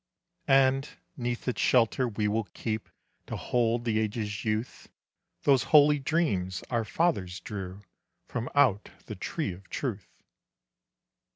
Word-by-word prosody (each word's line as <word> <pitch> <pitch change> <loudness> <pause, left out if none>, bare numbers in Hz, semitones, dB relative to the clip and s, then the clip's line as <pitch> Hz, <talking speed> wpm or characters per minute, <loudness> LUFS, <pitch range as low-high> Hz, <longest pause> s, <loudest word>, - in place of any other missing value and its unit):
"And 135 0 +4 0.3
'neath 120 -1 -3
its 125 - -1
shelter 125 +1 +3
we 105 -2 -1
will 110 +1 0
keep, 110 -1 -3 0.4
To - - -4
hold 120 -1 0
the 110 -2 +1
ages' 105 -1 -2
youth, 110 +3 -3 0.5
Those 135 -3 +4
holy 150 -1 +6
dreams 115 - 0
our 115 -2 +1
fathers 100 - 0
drew 95 -1 -7 0.4
From 125 0 -4
out 125 -8 +3 0.2
the - - -6
tree - - -3
of 95 +2 -15
truth." 105 -9 -4
115 Hz, 125 wpm, -28 LUFS, 105-130 Hz, 0.5 s, holy